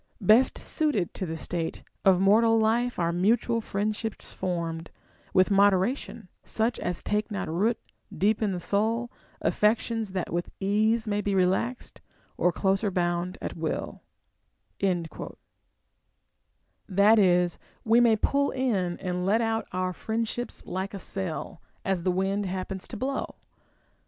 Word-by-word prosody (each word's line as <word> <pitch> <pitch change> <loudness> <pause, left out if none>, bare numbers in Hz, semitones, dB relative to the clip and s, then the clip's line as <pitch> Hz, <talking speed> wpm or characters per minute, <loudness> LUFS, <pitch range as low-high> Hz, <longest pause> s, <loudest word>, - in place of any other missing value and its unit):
471 215 0 +6
Best 260 - -1
suited 295 - -1
to 185 - -4
the 160 0 -4
state 165 0 -4 0.2
Of 190 -2 +5
mortal 225 +4 +5
life 230 +3 +1
are 170 -1 +1
mutual 230 +5 +2
friendsliips 215 +2 -3
formed 170 -3 -3 0.4
With 185 +2 +3
moderation, 200 +3 +2 0.2
such 225 +2 -1
as 180 -1 -3
take 210 +1 -1
not 205 -2 -3
root 205 +9 +1 0.3
Deep 210 +3 +1
in 210 -2 +1
the 180 - -3
soul, 225 +6 0 0.3
affections 220 0 +1
tliat 185 -2 -2
witli 175 +1 -2
ease 215 +3 +1
May 205 0 0
be 200 -1 -1
relaxed, 190 +7 0 0.3
or 180 - +2
closer 195 +3 +1
bound 175 0 -1
at - - -4
will,* 160 -1 -4 0.8
that 180 -4 0 2.1
is, 180 -3 +3 0.3
we 230 +1 +5
may 235 -2 +5
pull 280 +6 +1
in 200 -10 0
and 180 -1 -3
let 205 +5 +3
out 225 -1 -1
our 185 0 -1
friendships 230 +4 -3
like 190 +2 -4
a - - -5
sail, 180 -3 -4 0.2
as 190 -2 0
the 185 - 0
wind 195 +2 0
happens 190 +1 -4
to 230 - -7
blow. 270 +5 -3
200 Hz, 140 wpm, -27 LUFS, 180-225 Hz, 2.1 s, 471